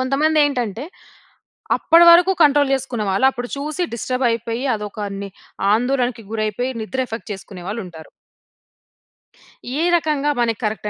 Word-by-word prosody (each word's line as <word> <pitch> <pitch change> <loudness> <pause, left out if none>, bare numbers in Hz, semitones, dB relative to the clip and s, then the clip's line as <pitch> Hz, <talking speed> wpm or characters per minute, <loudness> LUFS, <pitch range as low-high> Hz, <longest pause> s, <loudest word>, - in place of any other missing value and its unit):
కొంతమందేంటంటే 275 -4 +1 0.9
అప్పడి 335 +1 +5
వరకు 355 +3 +5
కంట్రోల్ 290 -1 +4
జేసుకునే 250 -5 -3
వాళ్ళు 195 +8 +2
అప్పుడు 245 -1 -6
చూసి 305 +5 -3
డిస్టర్బ్ 255 +2 -2
అయిపోయి 230 +2 -3
అదొక 210 0 -5 0.2
ని 200 - -6 0.5
ఆందోళనకు 245 -1 -1
గురైపోయి 220 +3 -2
నిద్ర 260 +4 -4
ఎఫెక్ట్ 225 -1 -8
చేసుకునే 190 -1 -10
వాళ్ళుంటారు. 180 -7 -7 1.7
ఏ - - +1
రకంగా 300 -3 0
మనకి 230 -2 0
కరెక్ట్ 215 0 -2
245 Hz, 120 wpm, -20 LUFS, 215-280 Hz, 1.7 s, అప్పడి